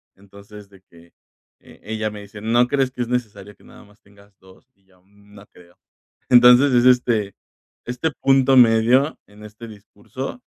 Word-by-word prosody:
entonces 100 +1 -17
de 95 -1 -21
que, 85 0 -21 0.5
eh, - - -20
ella 110 0 -5
me 105 0 -11
dice: 105 +1 -14
"¿No 120 +3 +1
crees 135 -1 -2
que 125 - -8
es 120 - -3
necesario 105 -5 -6
que - - -27
nada - - -18
más 105 +1 -26
tengas 100 0 -24
2?". 95 +7 -23
Y 95 - -40
yo: 95 -1 -30
"Mm, 100 +1 -25
no 100 0 -16
creo". 85 0 -22 0.6
Entonces, 125 +3 +5
es, 120 0 +2
este, 120 -6 +1 0.5
este 125 +6 -4
punto 135 0 +2
medio, 120 +4 +3
en 105 +1 -19
este 110 +2 -13
discurso, 110 - -11
110 Hz, 175 wpm, -19 LUFS, 100-125 Hz, 0.6 s, Entonces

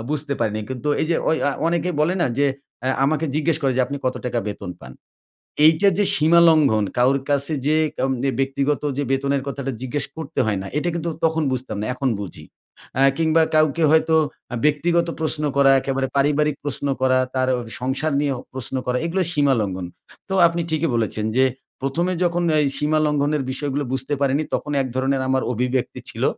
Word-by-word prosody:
বুঝতে 150 -1 -2
পারিনি। 110 -2 0
কিন্তু 130 +2 -4
এইযে 165 +1 +1
ঐ - - +3 0.2
আ - - +2 0.2
অনেকেই 170 +1 0
বলে 160 +4 +2
না 170 - +3
যে 145 - +4 0.4
আ - - +2 0.2
আমাকে 155 +3 +1
জিজ্ঞেস 155 +2 +1
করে 135 - +2
যে, 130 - +3
"আপনি 140 - -4
কত 130 - 0
টাকা 120 -1 -1
বেতন 100 -2 -6
পান?" 65 - -11 0.7
এইটা 160 +6 +5
যে 205 - +3
সীমা 160 +3 +4
লঙ্ঘন, 140 -10 +3
কারো 130 +3 +4
কাছে 140 +1 +1
যে 155 - +3 0.2
কন 130 +1 0 0.2
এ - - 0
ব্যক্তিগত 135 +1 0 0.2
যে 145 - 0
বেতনের 140 +1 0
কথাটা 140 -1 -3
জিজ্ঞেস 140 +2 -2
করতে 160 -3 -5
হয় 105 -3 0
না, 95 - -6
এটা 165 +4 0
কিন্তু 170 0 -2 0.2
তখন 160 -1 +1
বুঝতাম 130 -4 -3
না, - - -2
এখন 130 +1 -1
বুঝি। 85 -6 -8 0.5
অ্যা 135 - +3
কিংবা 160 0 +3
কাউকে 155 +1 +3
হয়তো 160 0 +3 0.4
আ - - -1
ব্যক্তিগত 170 +4 +2
প্রশ্ন 155 -1 -1
করা, 140 -1 +6
একেবারে 135 0 -1
পারিবারিক 150 +1 +2
প্রশ্ন 145 0 -3
করা, 130 0 +3 0.2
তার 130 0 +1 0.3
সংসার 130 +4 -1
নিয়েও 140 -3 -1
প্রশ্ন 130 0 -5
করা, 125 0 0
এগুলো 180 +3 0
সীমা 145 -4 +3
লঙ্ঘন। 95 -3 -3 0.4
তো 190 - -2
আপনি 170 0 -2
ঠিকই 160 0 0
বলেছেন। 110 -1 -1
যে 130 - +5 0.4
১ম 135 +6 -1
এ - - 0
যখন 175 0 +1 0.2
এই 145 - +2
সীমা 155 +1 +1
লঙ্ঘনের 150 -1 +1
বিষয়গুলো 145 +1 -2
বুঝতে 135 +2 -2
পারিনি, 140 +2 +2
তখন 150 - -2
এক 130 - -2
ধরনের 135 +1 0
আমার 130 0 +1
অভিব্যক্তি 125 +2 -1
ছিল। - - -4
140 Hz, 190 wpm, -22 LUFS, 130-155 Hz, 0.7 s, করা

